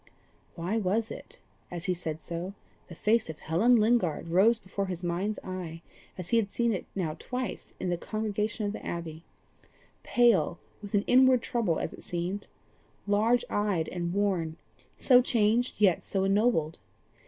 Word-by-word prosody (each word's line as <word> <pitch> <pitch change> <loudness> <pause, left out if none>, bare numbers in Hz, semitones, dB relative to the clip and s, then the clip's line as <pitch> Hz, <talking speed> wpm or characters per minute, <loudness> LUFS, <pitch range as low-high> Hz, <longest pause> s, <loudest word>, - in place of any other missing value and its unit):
Why 180 +6 -2
was 215 +2 0
it - - -10 0.3
that, - - -7
as 170 0 -3
he 185 - +1
said 160 -3 -5
so, 175 +3 -5 0.3
the 170 - -10
face 215 +2 +1
of 160 - -6
Helen 195 +10 +3
Lingard 215 -8 +2
rose 200 +7 +5
before 195 -2 -4
his 180 -1 -5
mind's 185 +5 -1
eye 175 -3 -6 0.3
as 180 -2 -6
he 235 - +3
had 225 -3 +2
now - - -28
seen 235 +2 +1
it 175 -4 -4
twice 250 -1 -5
in 180 - -2
the 175 - -1
congregation 215 +1 -2
at 205 - -2
the - - -7
Abbey 165 -2 -5 0.8
pale 215 -9 +3 0.2
with 205 -1 -4
an 200 - +3
inward 255 -1 +5
trouble 215 -9 0
as - - -3
it - - -12
seemed, 180 +4 -3 0.6
large 215 +4 +2
eyed 200 -6 0
and 170 -1 -3
worn 185 -5 0 0.4
so 250 -2 +6
changed, 235 -1 +1
yet 195 -5 +4
so 190 -1 -1
ennobled? 195 -5 +2
195 Hz, 165 wpm, -29 LUFS, 170-225 Hz, 0.8 s, so